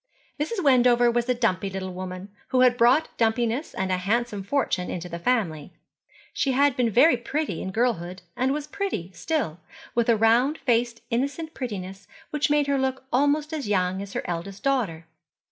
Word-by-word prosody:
Mrs. 370 Hz, +6 st, -2 dB
Wendover 245 Hz, -3 st, +5 dB
was 240 Hz, +1 st, -1 dB
a 250 Hz, -, +3 dB
dumpy 200 Hz, -5 st, 0 dB
little 190 Hz, -1 st, -5 dB
woman, 185 Hz, +1 st, -6 dB, 0.2 s
who 255 Hz, -, +2 dB
had 250 Hz, -1 st, +5 dB
brought 250 Hz, +6 st, +3 dB
dumpiness 235 Hz, +4 st, 0 dB
and 190 Hz, 0 st, -1 dB
a 185 Hz, -, +2 dB
handsome 210 Hz, +2 st, -1 dB
fortune 195 Hz, -5 st, -1 dB
into 180 Hz, 0 st, -4 dB
the 170 Hz, -1 st, -6 dB
family. 170 Hz, -9 st, -1 dB, 0.6 s
She 270 Hz, -, 0 dB
had 280 Hz, 0 st, +3 dB
been 245 Hz, -2 st, +2 dB
very 250 Hz, +8 st, +5 dB
pretty 245 Hz, -, -3 dB
in -, -, -4 dB
girlhood, 185 Hz, -5 st, -1 dB
and 260 Hz, +2 st, +1 dB
was 295 Hz, +1 st, -2 dB
pretty 300 Hz, -, -4 dB
still, 275 Hz, -, -2 dB, 0.3 s
with 235 Hz, 0 st, +1 dB
a 230 Hz, -, +5 dB
round 235 Hz, +7 st, +3 dB
faced 235 Hz, -2 st, 0 dB
innocent 280 Hz, +7 st, -2 dB
prettiness 195 Hz, -6 st, -6 dB, 0.2 s
which 300 Hz, 0 st, 0 dB
made 295 Hz, 0 st, +3 dB
her 280 Hz, -1 st, +1 dB
look 265 Hz, 0 st, -1 dB
almost 290 Hz, +4 st, +2 dB
as 295 Hz, -7 st, -3 dB
young 185 Hz, -1 st, +1 dB
as 200 Hz, -1 st, -8 dB
her -, -, -2 dB
eldest 180 Hz, +3 st, -5 dB
daughter. 220 Hz, -13 st, 0 dB
235 Hz, 180 wpm, -25 LUFS, 190-275 Hz, 0.6 s, Wendover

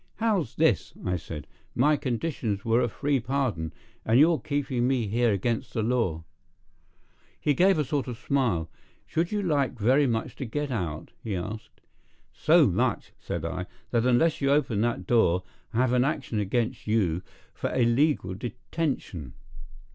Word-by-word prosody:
"How's 205 Hz, -, 0 dB
this?" -, -, +2 dB
I 90 Hz, -, +1 dB
said. 80 Hz, -3 st, -6 dB, 0.3 s
"My 150 Hz, +5 st, +4 dB
conditions 125 Hz, -6 st, -2 dB
were 115 Hz, +2 st, +3 dB
a 120 Hz, -, +1 dB
free 140 Hz, +4 st, 0 dB
pardon, 120 Hz, -, -1 dB, 0.3 s
and 115 Hz, +3 st, +4 dB
you're 160 Hz, +1 st, +5 dB
keeping 130 Hz, -3 st, -1 dB
me 130 Hz, -3 st, +1 dB
here 115 Hz, +3 st, +2 dB
against 110 Hz, +4 st, -1 dB
the 110 Hz, -, +1 dB
law." 110 Hz, -9 st, 0 dB, 1.2 s
He 145 Hz, -, +2 dB
gave 190 Hz, +5 st, +4 dB
a 150 Hz, -, +2 dB
sort 140 Hz, 0 st, -1 dB
of 120 Hz, -2 st, -5 dB
a -, -, -22 dB
smile. 110 Hz, -, 0 dB, 0.4 s
"Should 170 Hz, +2 st, -1 dB
you 210 Hz, -1 st, 0 dB
like 145 Hz, -7 st, +1 dB
very 130 Hz, +6 st, +4 dB
much 115 Hz, -2 st, -2 dB
to 135 Hz, -, -4 dB
get 145 Hz, +4 st, -3 dB
out?" 85 Hz, -10 st, -3 dB
he 105 Hz, -4 st, -2 dB
asked. 105 Hz, +5 st, -6 dB, 0.5 s
"So -, -, +5 dB
much," -, -, 0 dB
said 85 Hz, -1 st, -4 dB
I, 90 Hz, +2 st, -3 dB, 0.2 s
"that 120 Hz, 0 st, +2 dB
unless 145 Hz, +7 st, +3 dB
you 140 Hz, -, +2 dB
open 130 Hz, -7 st, +2 dB
that 115 Hz, -5 st, -1 dB
door 90 Hz, -6 st, +3 dB, 0.3 s
I'll 120 Hz, +1 st, +1 dB
have 130 Hz, -1 st, +2 dB
an 125 Hz, 0 st, +4 dB
action 135 Hz, -6 st, -1 dB
against 115 Hz, +4 st, -1 dB
you 95 Hz, -6 st, +1 dB, 0.3 s
for -, -, -3 dB
illegal 120 Hz, -, +2 dB
detention." 120 Hz, -, -4 dB
120 Hz, 160 wpm, -27 LUFS, 105-140 Hz, 1.2 s, you're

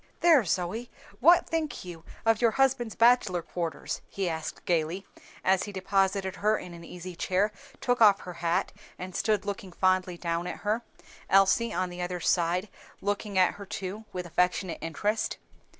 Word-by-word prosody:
"There, 325 Hz, -7 st, +6 dB
Zoe, 185 Hz, +8 st, -2 dB, 0.3 s
what 340 Hz, +7 st, +6 dB
think 320 Hz, -, -2 dB
you 170 Hz, -2 st, -9 dB, 0.2 s
of 225 Hz, 0 st, +3 dB
your 235 Hz, -, +5 dB
husband's 250 Hz, -2 st, +1 dB
bachelor 230 Hz, -7 st, +4 dB
quarters?" 170 Hz, -1 st, -4 dB
he 195 Hz, -2 st, -2 dB
asked 160 Hz, -1 st, -4 dB
gayly, 170 Hz, +3 st, 0 dB, 0.4 s
as 190 Hz, 0 st, +3 dB
he 205 Hz, -, -7 dB
deposited 195 Hz, 0 st, 0 dB
her 215 Hz, +1 st, +2 dB
in 180 Hz, -, -8 dB
an 170 Hz, 0 st, -10 dB
easy 180 Hz, +1 st, -8 dB
chair, 190 Hz, +5 st, +1 dB, 0.3 s
took 245 Hz, -1 st, +1 dB
off 205 Hz, -3 st, +7 dB
her 180 Hz, -, -7 dB
hat, 175 Hz, +3 st, 0 dB, 0.2 s
and 185 Hz, 0 st, -7 dB
stood 210 Hz, -3 st, +1 dB
looking 200 Hz, -2 st, -5 dB
fondly 185 Hz, -1 st, +1 dB
down 170 Hz, 0 st, -2 dB
at -, -, -6 dB
her, 215 Hz, +3 st, 0 dB, 0.5 s
Elsie 195 Hz, +4 st, +4 dB
on 185 Hz, -2 st, -1 dB
the 175 Hz, 0 st, -6 dB
other 180 Hz, 0 st, -3 dB
side, 175 Hz, +3 st, +1 dB, 0.3 s
looking 205 Hz, 0 st, -2 dB
at 185 Hz, -1 st, +5 dB
her 200 Hz, -, -9 dB
too 195 Hz, +3 st, -5 dB
with 180 Hz, -1 st, -4 dB
affectionate 180 Hz, +1 st, 0 dB
interest. 210 Hz, +7 st, -1 dB
190 Hz, 165 wpm, -28 LUFS, 180-215 Hz, 0.5 s, off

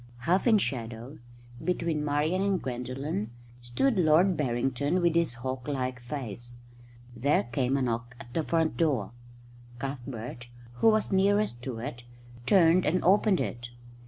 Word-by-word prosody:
Half 180 Hz, -, +2 dB
in 225 Hz, -2 st, +6 dB
shadow, 120 Hz, -, -4 dB, 0.4 s
between 165 Hz, -4 st, -1 dB
Marian 150 Hz, +5 st, 0 dB
and 195 Hz, -2 st, +1 dB
Gwendolen, 125 Hz, -3 st, -4 dB, 0.3 s
stood 195 Hz, -, 0 dB
Lord 175 Hz, +3 st, +4 dB
Barrington 135 Hz, +4 st, 0 dB
with 170 Hz, -2 st, +2 dB
his 165 Hz, -7 st, +1 dB
hawk 130 Hz, +2 st, -5 dB
like 130 Hz, -3 st, -2 dB
face. 120 Hz, -2 st, -7 dB, 0.6 s
There 140 Hz, +5 st, +2 dB
came 125 Hz, +3 st, 0 dB
a 135 Hz, -, 0 dB
knock 120 Hz, 0 st, -3 dB
at 120 Hz, -, -12 dB
the 165 Hz, -, +1 dB
front 160 Hz, 0 st, 0 dB
door. 140 Hz, -, +1 dB, 0.7 s
Cuthbert, 120 Hz, -2 st, -6 dB, 0.3 s
who 225 Hz, -, +3 dB
was 215 Hz, -1 st, +1 dB
nearest 195 Hz, -8 st, +2 dB
to 130 Hz, -4 st, -4 dB
it, 120 Hz, 0 st, -6 dB, 0.4 s
turned 175 Hz, 0 st, +5 dB
and 180 Hz, +4 st, +1 dB
opened 195 Hz, +1 st, +4 dB
it. 120 Hz, 0 st, -4 dB
140 Hz, 140 wpm, -28 LUFS, 120-170 Hz, 0.7 s, in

